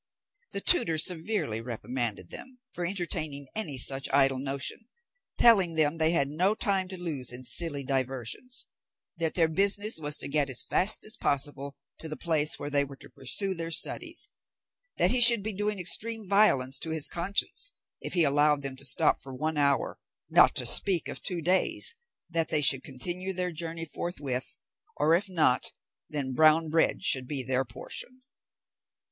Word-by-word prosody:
The - - -2
tutor 165 - +2
severely 160 - -2
reprimanded 115 -4 -4
them 260 0 -8
for 175 -1 -4
entertaining 155 -6 -4
any 165 -11 -3
such 135 +2 +3
idle 135 -1 +2
notion, 140 - -4 0.5
telling 195 -8 +4
them 155 +1 +1
they 160 0 +3
had 150 -5 +1
no 180 +8 0
time 195 -3 -1
to 185 0 -9
lose 145 -9 -2
in 125 +1 -7
silly 140 +3 +1
diversions; 135 - -3 0.5
that 165 -2 -3
their 165 -2 +2
business 200 +4 +2
was 150 -1 -1
to - - -6
get 140 -1 0
as 125 - -2
fast 195 +4 0
as 215 +1 -5
possible 140 -2 -3 0.2
to 160 - -8
the 155 - -7
place 155 -3 0
where 145 - -7
they 145 0 +1
were 140 0 -10
to - - -15
pursue 190 +9 -1
their 165 -2 -5
studies; 295 - +2 0.7
that - - +3
he 250 - +2
should 235 -4 +11
be 215 +1 -4
doing 210 +1 -3
extreme 220 +4 -2
violence 160 -11 +2
to 165 - -1
his 160 -2 +1
conscience 200 - -2 0.3
if - - -6
he 175 - +3
allowed 145 0 +2
them 135 -1 -3
to 140 - -8
stop 145 +3 +2
for 135 -1 -8
one 155 +4 -3
hour, 140 -1 0 0.3
not - - +5
to - - +3
speak 185 -4 +4
of - - -6
two 175 -5 -3
days; 190 - +2 0.3
that 165 -2 -2
they 155 - +2
should 135 -1 +4
continue 175 +8 -5
their 180 -1 -3
journey 165 0 -6
forthwith, 145 -6 -5 0.4
or, 150 +2 +2
if 190 +4 0
not, 155 -8 0 0.4
then 140 -3 -4
brown 155 +3 +3
bread 165 +1 +1
should 130 -2 +1
be 140 -2 0
their 130 +1 0
portion. 245 - -6
160 Hz, 175 wpm, -27 LUFS, 140-185 Hz, 0.7 s, should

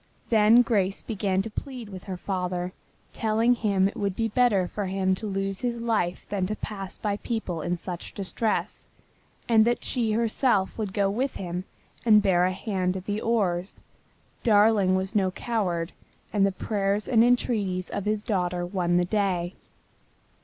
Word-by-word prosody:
Then 225 +2 +6
Grace 200 -5 0
began 195 -3 0
to 225 - -7
plead 250 -3 -6
with 185 -2 -9
her 190 -2 -5
father, 180 -1 -3 0.4
telling 225 +2 +2
him 200 -5 +2
it 200 - -6
would 200 -2 -2
be 225 +1 0
better 210 -5 +3
for 205 0 -4
him 190 0 +1
to 215 +3 -3
lose 195 -1 -2
his 240 -1 -1
life 220 -7 -1
than 190 -3 -1
to 215 - -2
pass 195 -3 -6
by 205 -1 -1
people 210 -8 -3
in 175 +3 -1
such 175 0 -7
distress, 210 +3 -2 0.6
and 225 -2 +6
that 240 +2 +1
she 230 -4 0
herself 225 -2 +1
would 210 -4 -3
go 200 0 +1
with 250 +7 -1
him 180 0 -4 0.4
and 215 -3 +6
bear 180 -3 +3
a 185 - +1
hand 185 -1 -1
at 185 - -8
the 205 +1 -2
oars. 195 -5 -1 0.6
Darling 205 -3 +4
was 190 +2 -1
no 195 -4 +2
coward, 185 -5 -2 0.4
and 200 -2 +4
the - - 0
prayers 200 +1 -1
and 230 -3 +5
entreaties 210 -7 +1
of 200 -1 -3
his 210 0 0
daughter 180 -4 -1
won 175 -1 0
the 175 - +2
day. 185 -3 0
200 Hz, 170 wpm, -26 LUFS, 185-220 Hz, 0.6 s, Then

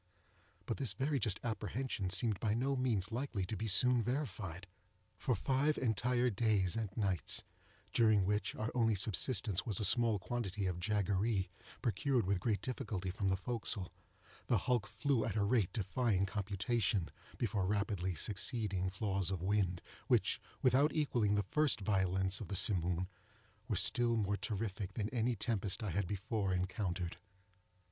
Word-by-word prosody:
But - - -2
this 130 -7 -1
very 135 +6 0
just 105 -4 -1
apprehension 110 -2 -2
seemed 105 +1 0
by 110 -2 0
no 135 +4 0
means 115 -6 0
likely 120 -5 -2
to 110 - -4
be 110 +2 -3
soon 120 +5 +4
verified. 105 - -3 0.5
For 125 - +1
five 135 +8 +1
entire 125 +1 +1
days 100 -4 +1
and 110 -3 -2
nights—during 105 +1 0
which 105 +2 0
our 110 +2 -3
only 115 -3 +2
subsistence 100 0 +2
was 110 -7 -2
a 105 - +1
small 115 +1 +3
quantity 105 -1 -3
of 90 -2 -2
jaggeree, 100 0 0 0.3
procured 120 +1 +1
with 95 0 +1
great 105 +1 -1
difficulty 105 -8 -3
from 100 +2 -2
the 95 0 +2
forecastle—the 105 -1 -3
hulk 120 -6 0
flew 115 +3 0
at 110 - -2
a 105 - +2
rate 105 -3 +2
defying 105 -2 0
computation, 100 0 -1 0.3
before 100 -5 0
rapidly 100 -3 -1
succeeding 100 -1 0
flaws 100 -2 -1
of 95 -3 -3
wind, 95 -3 0 0.2
which, - - +2 0.2
without 135 +4 +4
equalling 120 -9 +1
the 105 - +1
first 150 -4 +3
violence 95 -1 +1
of 105 - -5
the 100 - -4
Simoom, 90 -2 +4 0.6
were - - 0
still 120 -1 +2
more 100 -2 +1
terrific 100 -2 -3
than 105 0 -2
any 120 0 0
tempest 105 -2 -1
I 105 - -2
had 95 +2 -1
before 100 0 -1
encountered. 90 -2 -2
105 Hz, 150 wpm, -35 LUFS, 95-120 Hz, 0.6 s, soon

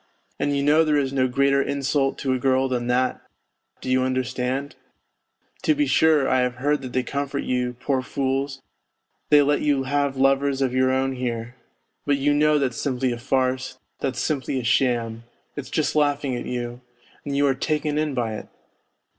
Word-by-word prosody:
And 145 -1 0
you 140 - 0
know 150 +3 +5
there 155 -2 +2
is 135 -1 0
no 130 -1 +2
greater 140 +2 +2
insult 140 0 0
to 130 -2 -1
a 130 - -1
girl 130 +1 +2
than 125 -2 -2
that, 125 +1 +1 0.6
do - - -8
you 130 0 +3
understand? 130 +2 -2 0.9
To 310 - +2
be 295 0 +2
sure, 155 - +3
I 130 - +2
have 125 0 0
heard 145 +3 0
that 130 -2 -7
they 130 - +1
comfort 140 +1 -3
you, 125 -1 -1
poor 135 -1 0
fools, 135 +1 -2 0.7
they 150 -1 +7
let 145 +1 +1
you 145 -3 +1
have 140 0 0
lovers 135 +1 +2
of 130 -2 0
your 130 0 +3
own 130 0 0
here. 120 -1 -3 0.5
But 145 -1 +1
you 145 +1 +2
know 150 +1 +3
that's 130 -4 -1
simply 130 -2 0
a 120 - -4
farce, 130 +1 -1 0.2
that's 130 -3 -2
simply 135 -3 -1
a - - -5
sham, 115 -2 +1 0.3
it's 145 -3 -6
just 155 - -1
laughing 145 -3 +1
at 120 - -5
you, 120 0 -4 0.4
and 140 -1 -3
you 145 - +3
are 135 - +3
taken 150 +2 -1
in 150 -3 -1
by 115 -3 -1
it - - -9
135 Hz, 190 wpm, -23 LUFS, 130-145 Hz, 0.9 s, they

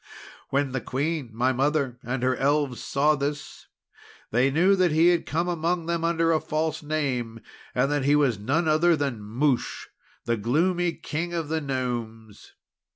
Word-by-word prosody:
"When 140 -1 0
the 130 -1 -2
Queen 145 +1 -2
my 125 +4 +1
mother 135 -2 0
and 125 +1 -3
her 130 0 +2
Elves 140 -2 0
saw 145 +2 +2
this, 145 0 -4 0.6
they 125 +4 +3
knew 175 +8 +4
that 185 -3 +2
he 160 +3 +5
had 175 -1 +1
come 170 +4 -1
among 170 0 -1
them 170 0 -1
under 165 0 +2
a 160 - +3
false 155 +1 -2
name, 130 -7 -2 0.4
and 135 +3 +2
that 145 -2 0
he 145 +1 +4
was 135 -8 +2
none 145 +10 0
other 160 +2 +4
than 140 -7 -2
Mouche, 125 +5 -1 0.4
the 115 0 0
gloomy 170 - +1
King 165 +2 -4
of 165 -3 -3
the 160 0 -1
Gnomes. 120 -6 -5
145 Hz, 165 wpm, -25 LUFS, 125-160 Hz, 0.6 s, he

